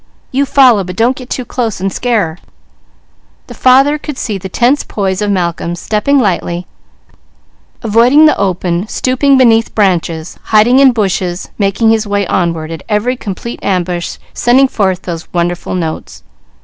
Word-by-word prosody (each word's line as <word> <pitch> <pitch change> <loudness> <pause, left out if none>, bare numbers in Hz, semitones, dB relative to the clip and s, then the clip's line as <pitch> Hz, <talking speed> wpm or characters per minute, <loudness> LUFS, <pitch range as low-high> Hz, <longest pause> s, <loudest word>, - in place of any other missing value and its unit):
You 275 +2 0
follow, 255 -8 +4
but 180 0 -7
don't 240 +5 +1
get 255 -1 -11
too 255 - -4
close 230 -6 -3
and 195 +1 -2
scare 235 -5 0
her." 160 0 -8 1.1
The - - -11
father 270 +4 +3
could 295 -2 -7
see 210 -4 -3
the 190 - -7
tense 245 +9 +1
poise 195 -1 -3
of 210 - -1
Malcolm, 175 -3 -2
stepping 215 +9 0
lightly, 180 -6 -1 1.2
avoiding 235 +7 +4
the 305 - +4
open, 180 -1 -1
stooping 265 +4 +1
beneath 230 -3 +3
branches, 175 -5 -1
hiding 225 +4 +4
in 275 -1 +6
bushes, 190 -5 -2
making 205 +3 +2
his 220 -1 0
way 200 0 0
onward, 165 -3 -2
at 165 - -7
every 220 +4 0
complete 235 +1 -7
ambush 180 -2 -2 0.2
sending 260 +3 +3
forth 190 -7 -1
those 170 -2 -7
wonderful 175 +1 -2
notes. 165 -3 -5
210 Hz, 155 wpm, -13 LUFS, 180-250 Hz, 1.2 s, in